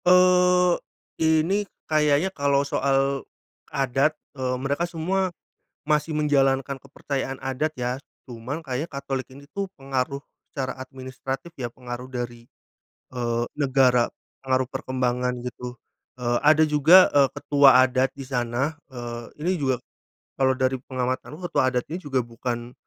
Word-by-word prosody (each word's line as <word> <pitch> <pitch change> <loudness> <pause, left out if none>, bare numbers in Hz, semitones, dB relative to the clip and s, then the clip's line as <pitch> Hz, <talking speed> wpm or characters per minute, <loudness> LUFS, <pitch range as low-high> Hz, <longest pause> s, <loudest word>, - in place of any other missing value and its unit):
Eee, 180 0 +5 0.5
ini 160 +5 +3 0.2
kayaknya 155 +4 +2
kalau 140 -2 +2
soal, 135 0 +1 0.5
adat, 140 +2 +1 0.2
eee, 130 -2 -1
mereka 140 +6 -1
semua, 185 +3 0 0.6
masih 150 +1 +1
menjalankan 135 -2 +2
kepercayaan 135 -1 -4
adat 135 +4 -1
ya 125 +2 -2 0.2
cuman 130 +6 -6
kayaknya 135 +4 -3
Katolik 140 -1 -4
ini 140 +2 -13
tuh 200 -1 -3
pengaruh, 135 0 -2 0.3
secara 135 -2 -3
administratif 130 +3 -6
ya 120 - -2
pengaruh 120 +1 -7
dari, 120 -2 -5 0.6
eee, 120 -2 -1
negara 130 -4 +4 0.4
pengaruh 130 -1 +1
perkembangan 125 -2 -1
gitu, 125 0 -6 0.5
eee, 120 0 +1
ada 155 +1 +6
juga, 160 +5 +7
eee, 140 -1 +5
ketua 140 -3 +6
adat 130 +1 +1
di 140 - -7
sana, 125 +2 -1 0.2
eee, 120 -1 -6 0.2
ini 180 - +2
juga, 130 -3 0 0.5
kalau 130 -1 +3
dari 130 0 +1
pengamatanku 130 +3 -3
ketua 130 - +2
adat 125 -1 -1
ini 160 - -5
juga 135 -5 0
bukan, 120 0 -5
135 Hz, 130 wpm, -25 LUFS, 125-150 Hz, 0.6 s, juga